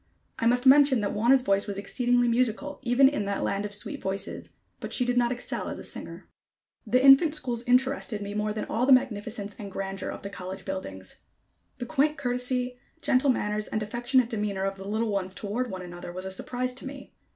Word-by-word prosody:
I 230 Hz, -, +2 dB
must 245 Hz, +2 st, +2 dB
mention 270 Hz, -2 st, +6 dB
that 205 Hz, -, -1 dB
Wauna's 245 Hz, +5 st, +4 dB
voice 200 Hz, -2 st, +2 dB
was 200 Hz, -1 st, -4 dB
exceedingly 245 Hz, +4 st, +1 dB
musical, 250 Hz, +4 st, 0 dB
even 260 Hz, +1 st, +5 dB
in 270 Hz, -7 st, -1 dB
that 200 Hz, 0 st, -2 dB
land 200 Hz, +1 st, -1 dB
of 205 Hz, -, -6 dB
sweet 285 Hz, +7 st, -5 dB
voices, 190 Hz, 0 st, -4 dB, 0.3 s
but -, -, -6 dB
she 250 Hz, -, +1 dB
did 245 Hz, 0 st, 0 dB
not 240 Hz, -1 st, +2 dB
excel 245 Hz, -1 st, -3 dB
as -, -, -5 dB
a -, -, -8 dB
singer. -, -, -7 dB, 0.6 s
The 255 Hz, +5 st, +3 dB
infant 285 Hz, +3 st, +7 dB
schools 245 Hz, -6 st, -2 dB
interested 250 Hz, -3 st, +2 dB
me 205 Hz, 0 st, -5 dB
more 210 Hz, 0 st, -1 dB
than 215 Hz, 0 st, -3 dB
all 245 Hz, +3 st, -1 dB
the 270 Hz, -, +8 dB
magnificence 215 Hz, -5 st, 0 dB
and 200 Hz, -2 st, -7 dB
grandeur 195 Hz, 0 st, -4 dB
of -, -, -7 dB
the 200 Hz, -, -6 dB
college 185 Hz, 0 st, -7 dB
buildings. 95 Hz, -, -6 dB, 0.6 s
The 245 Hz, -, -5 dB
quaint 300 Hz, +3 st, +1 dB
courtesy, 250 Hz, 0 st, -1 dB, 0.2 s
gentle 260 Hz, +2 st, +3 dB
manners 210 Hz, -4 st, 0 dB
and 215 Hz, -, -2 dB
affectionate 240 Hz, +3 st, +1 dB
demeanor 205 Hz, -3 st, -2 dB
of 195 Hz, 0 st, -1 dB
the 195 Hz, 0 st, -8 dB
little 220 Hz, +2 st, -1 dB
ones 190 Hz, -1 st, -2 dB
toward 235 Hz, +5 st, -3 dB
one 185 Hz, -2 st, -6 dB
another, 175 Hz, 0 st, -8 dB
was 185 Hz, +1 st, -7 dB
a 190 Hz, -, -4 dB
surprise 250 Hz, +6 st, -3 dB
to 265 Hz, -, -6 dB
me. 270 Hz, 0 st, -10 dB
230 Hz, 205 wpm, -27 LUFS, 200-255 Hz, 0.6 s, the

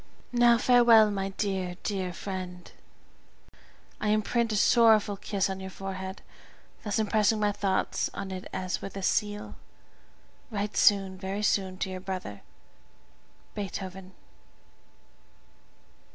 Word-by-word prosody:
Now 240 Hz, -1 st, +5 dB
farewell, 230 Hz, -3 st, +6 dB
my 195 Hz, -1 st, -2 dB
dear, 190 Hz, -3 st, -3 dB
dear 190 Hz, -3 st, -2 dB
friend; 180 Hz, -1 st, -7 dB, 1.3 s
I 215 Hz, -, -2 dB
imprint 220 Hz, +2 st, +1 dB
a -, -, 0 dB
sorrowful 215 Hz, -1 st, +4 dB
kiss 200 Hz, 0 st, -1 dB
on 190 Hz, -1 st, -4 dB
your 190 Hz, 0 st, -6 dB
forehead, 190 Hz, 0 st, -6 dB, 0.6 s
thus 210 Hz, -3 st, -2 dB
impressing 215 Hz, 0 st, +2 dB
my 210 Hz, -1 st, +2 dB
thoughts 195 Hz, -1 st, -1 dB
on 195 Hz, -1 st, -6 dB
it 185 Hz, 0 st, -6 dB
as 185 Hz, 0 st, -3 dB
with 195 Hz, -, -7 dB
a 195 Hz, -, -5 dB
seal. 205 Hz, +2 st, -1 dB, 1.0 s
Write 210 Hz, -2 st, -3 dB
soon, 195 Hz, -2 st, +3 dB
very 195 Hz, +2 st, -4 dB
soon, 190 Hz, -2 st, +1 dB
to 190 Hz, -, -2 dB
your 185 Hz, -, -5 dB
brother, 185 Hz, -, -6 dB, 1.1 s
BEETHOVEN. 190 Hz, -2 st, -6 dB
195 Hz, 120 wpm, -28 LUFS, 190-210 Hz, 1.3 s, farewell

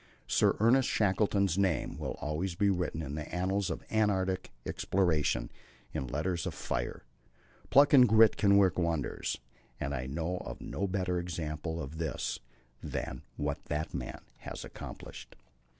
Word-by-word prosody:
Sir -, -, +3 dB
Ernest 120 Hz, +4 st, +4 dB
Shackleton's 100 Hz, -2 st, +2 dB
name 90 Hz, -8 st, +1 dB
will -, -, -4 dB
always 85 Hz, +4 st, -2 dB
be 100 Hz, +2 st, +3 dB
written 90 Hz, -3 st, -1 dB
in 70 Hz, -1 st, -5 dB
the 75 Hz, 0 st, -5 dB
annals 95 Hz, +2 st, 0 dB
of -, -, -4 dB
Antarctic 95 Hz, -4 st, +1 dB, 0.2 s
exploration 80 Hz, -7 st, +1 dB, 0.4 s
in 65 Hz, -, -2 dB
letters 85 Hz, +7 st, -1 dB
of -, -, -4 dB
fire. 60 Hz, -1 st, -3 dB, 0.7 s
Pluck 140 Hz, +2 st, +6 dB
and 125 Hz, -3 st, +9 dB
grit 110 Hz, 0 st, +7 dB
can 100 Hz, -1 st, +5 dB
work 95 Hz, -2 st, +4 dB
wonders, 85 Hz, -4 st, -1 dB, 0.4 s
and 70 Hz, -, -2 dB
I 65 Hz, 0 st, -3 dB
know 80 Hz, +6 st, -2 dB
of -, -, -7 dB
no 100 Hz, -, -3 dB
better 90 Hz, -2 st, 0 dB
example 80 Hz, -1 st, -3 dB
of 80 Hz, +1 st, -6 dB
this 80 Hz, -2 st, -2 dB, 0.4 s
than -, -, -4 dB
what 75 Hz, -1 st, -3 dB
that 75 Hz, +1 st, -3 dB
man -, -, -5 dB, 0.2 s
has -, -, -7 dB
accomplished. -, -, -9 dB
90 Hz, 150 wpm, -31 LUFS, 75-100 Hz, 0.7 s, and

